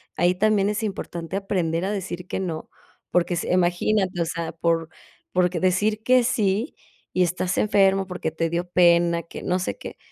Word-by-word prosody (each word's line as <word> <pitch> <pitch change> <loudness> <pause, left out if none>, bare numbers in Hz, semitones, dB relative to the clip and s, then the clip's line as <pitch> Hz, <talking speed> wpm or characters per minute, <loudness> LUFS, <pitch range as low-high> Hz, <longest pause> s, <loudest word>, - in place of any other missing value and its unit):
ahí 175 +1 +2
también 205 0 +2
es 210 +2 -2
importante 180 -4 -4
aprender 180 -4 -1
a 200 - -1
decir 185 -3 -5
que - - -3
no, 170 -4 -4 0.4
porque 175 0 +2
si, - - -3
imagínate, 180 +1 +1
o - - +1
sea, 165 0 -3
por 165 0 0 0.4
porque 180 -1 +1
decir 205 +4 +1
que 255 +1 +4
sí, 220 +1 0 0.4
y 185 - +1
estás 180 +1 -1
enfermo, 195 -2 +3
porque 180 -3 -3
te 165 +1 -1
dio 170 +2 -2
pena, 170 -1 +4
que 165 - -9
no 180 +1 0
sé 185 - -3
qué, - - -9
180 Hz, 180 wpm, -24 LUFS, 170-195 Hz, 0.4 s, que